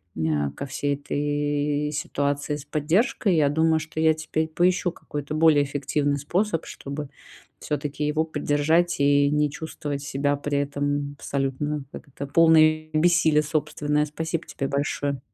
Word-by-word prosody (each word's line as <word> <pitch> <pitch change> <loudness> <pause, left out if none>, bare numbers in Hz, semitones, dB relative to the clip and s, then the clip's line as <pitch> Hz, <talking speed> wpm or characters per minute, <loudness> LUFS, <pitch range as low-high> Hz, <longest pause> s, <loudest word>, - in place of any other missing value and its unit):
мя 75 -3 0
ко - - -5
всей 140 +1 -1
этой 145 +1 -1
ситуации 145 0 -2
с 145 - -9
поддержкой. 180 - +1
Я 150 -3 +3
думаю, 160 +1 +2
что 155 0 -6
я 160 0 +5
теперь 155 0 -2
поищу 175 +2 +1
какой-то 145 0 -6
более 155 -2 +5
эффективный 145 +1 -1
способ, 170 +5 -1
чтобы 140 +1 -7 0.5
всё-таки 150 0 -3
его 155 +1 +1
поддержать 155 +2 +1
и 140 0 +4
не 150 0 +2
чувствовать 145 -2 -5
себя 145 0 0
при 145 0 -1
этом 145 0 -2
абсолютно, 140 +2 -2
как - - -10
это- 140 +1 -6
полной 155 0 +4
бессилия 160 -1 +4
собственное. 150 -1 0
Спасибо 160 +2 -4
тебе 135 - -3
большое. 140 0 -1
150 Hz, 140 wpm, -24 LUFS, 145-155 Hz, 0.5 s, я